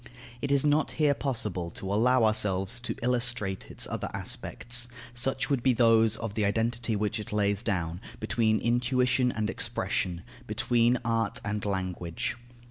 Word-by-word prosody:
It 140 Hz, -, -1 dB
is 140 Hz, 0 st, +4 dB
not 150 Hz, +1 st, +2 dB
here 150 Hz, -2 st, +3 dB
possible 105 Hz, -11 st, -3 dB
to 95 Hz, +3 st, -5 dB
allow 125 Hz, +3 st, +4 dB
ourselves 105 Hz, 0 st, +2 dB
to 120 Hz, -, -4 dB
illustrate 120 Hz, -6 st, 0 dB
its -, -, -3 dB
other -, -, -4 dB
aspects, 120 Hz, +1 st, -1 dB, 0.3 s
such 130 Hz, +2 st, +2 dB
as -, -, -11 dB
would 135 Hz, -3 st, +2 dB
be 130 Hz, +1 st, +3 dB
those 115 Hz, -2 st, +4 dB
of 110 Hz, -2 st, -4 dB
the 110 Hz, -1 st, 0 dB
identity, 115 Hz, +2 st, 0 dB
which 105 Hz, +2 st, -1 dB
it 105 Hz, -, -7 dB
lays 100 Hz, -1 st, +1 dB
down, 90 Hz, -5 st, -2 dB, 0.2 s
between 110 Hz, -2 st, +1 dB
intuition 125 Hz, +2 st, +2 dB
and 110 Hz, -2 st, -2 dB
expression, 90 Hz, -4 st, -2 dB, 0.2 s
between 120 Hz, 0 st, +2 dB
art 115 Hz, -2 st, 0 dB
and 105 Hz, 0 st, -2 dB
language. 95 Hz, -4 st, -3 dB
115 Hz, 155 wpm, -28 LUFS, 100-120 Hz, 0.3 s, is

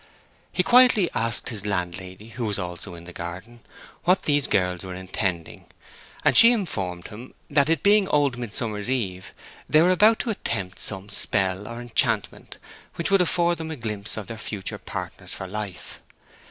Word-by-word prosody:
He 180 Hz, -, +1 dB
quietly 245 Hz, -5 st, +5 dB
asked 115 Hz, +2 st, -1 dB
his 110 Hz, -5 st, -4 dB
landlady, 95 Hz, +1 st, -4 dB
who 120 Hz, 0 st, -5 dB
was 105 Hz, -2 st, -1 dB
also 90 Hz, -1 st, -5 dB
in 85 Hz, -, -11 dB
the 90 Hz, +1 st, -11 dB
garden, 90 Hz, +9 st, -8 dB, 0.4 s
what 180 Hz, +2 st, +3 dB
these 145 Hz, -2 st, +2 dB
girls 90 Hz, -2 st, 0 dB
were 95 Hz, -1 st, -7 dB
intending, 90 Hz, -2 st, -3 dB, 0.6 s
and -, -, +4 dB
she 230 Hz, +1 st, +10 dB
informed 95 Hz, -, -3 dB
him 115 Hz, +5 st, -11 dB, 0.2 s
that 140 Hz, 0 st, +3 dB
it 165 Hz, -, +1 dB
being 205 Hz, -1 st, +4 dB
Old 145 Hz, -5 st, +2 dB
Midsummer 115 Hz, -2 st, -2 dB
Eve, 100 Hz, -5 st, -3 dB, 0.4 s
they 155 Hz, -, +5 dB
were 180 Hz, -, +4 dB
about 215 Hz, +5 st, +5 dB
to 235 Hz, -, -2 dB
attempt 100 Hz, -, -4 dB
some 95 Hz, -1 st, -3 dB
spell 95 Hz, -1 st, 0 dB
or 115 Hz, 0 st, -7 dB
enchantment 120 Hz, -1 st, -1 dB, 0.4 s
which 170 Hz, -, -1 dB
would 195 Hz, -1 st, +5 dB
afford 175 Hz, -1 st, +1 dB
them 160 Hz, 0 st, -5 dB
a 160 Hz, -, -4 dB
glimpse 110 Hz, -5 st, -5 dB
of 110 Hz, -, -5 dB
their 115 Hz, +2 st, -7 dB
future 105 Hz, -3 st, -4 dB
partners -, -, -7 dB
for 95 Hz, -, -6 dB
life. 100 Hz, -1 st, -6 dB
110 Hz, 170 wpm, -24 LUFS, 95-155 Hz, 0.6 s, she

